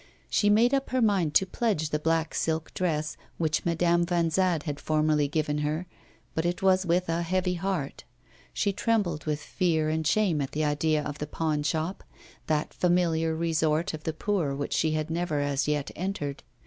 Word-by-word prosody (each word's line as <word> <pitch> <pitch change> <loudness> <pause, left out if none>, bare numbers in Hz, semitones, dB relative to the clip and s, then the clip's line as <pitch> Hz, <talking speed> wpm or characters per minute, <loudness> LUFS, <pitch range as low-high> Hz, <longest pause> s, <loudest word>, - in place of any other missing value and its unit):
She 205 - +3
made 230 +5 +4
up 275 0 +1
her 255 - 0
mind 195 -10 +2
to 190 - +6
pledge 185 -6 -1
the 150 - 0
black 165 +1 0
silk 160 0 -1
dress 155 -4 -1 0.2
which 160 -2 0
Madame 170 0 +2
Vanzade 170 -1 +1
had 145 -2 -4
formerly 155 -1 +2
given 150 0 -1
her, 150 +4 -1 0.5
but 160 - -1
it 175 +2 -2
was 185 -1 +3
with 180 +2 +2
a 165 +1 0
heavy 180 +1 0
heart; 180 -5 -3 0.5
she 200 - 0
trembled 200 -8 0
with 150 -1 -1
fear 160 -4 0
and 160 0 0
shame 180 -5 +2
at 135 - -4
the 155 +1 0
idea 150 +1 +1
of 145 0 -5
the 150 - -3
pawnshop, 155 +3 -1 0.4
that 155 -1 0
familiar 165 -2 +1
resort 160 +1 +1
of 155 -1 -7
the 160 - -2
poor 165 -5 -1
which 140 +1 -3
she 155 -1 +1
had 155 +1 -2
never 165 -3 -1
as 145 -1 0
yet 150 -2 -1
entered. 165 -7 -3
160 Hz, 180 wpm, -27 LUFS, 150-180 Hz, 0.5 s, to